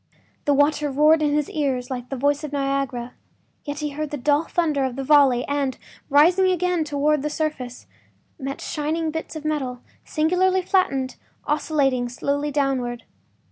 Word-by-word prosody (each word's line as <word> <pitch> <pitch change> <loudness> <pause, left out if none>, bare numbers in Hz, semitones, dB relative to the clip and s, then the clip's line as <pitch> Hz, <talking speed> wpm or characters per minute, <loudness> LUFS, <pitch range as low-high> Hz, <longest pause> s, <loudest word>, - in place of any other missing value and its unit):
The 290 - +3
water 290 +1 +2
roared 305 +3 +4
in 295 -1 +2
his 300 -1 +1
ears 265 -4 -1
like 250 -1 -5
the 270 - -3
voice 285 +3 +1
of 300 - -5
Niagara, 275 -3 -2 0.5
yet 290 0 -4
he 300 - -1
heard 300 +1 -4
the 295 - -4
dull 290 +4 +2
thunder 310 -5 0
of 260 -2 -2
the 270 - -3
volley 270 -4 +5
and, 280 -2 -1 0.3
rising 345 +7 +5
again 360 -2 +1
toward 295 0 +1
the 300 - -2
surface, 295 -6 -4 0.5
met 275 0 -5
shining 315 +2 -2
bits 320 +1 -5
of 310 -1 -7
metal, 265 -5 -2 0.2
singularly 365 +4 +1
flattened, 275 -9 +1 0.3
oscillating 280 -5 +1
slowly 285 +4 -1
downward. 265 -4 -1
290 Hz, 160 wpm, -23 LUFS, 270-310 Hz, 0.5 s, volley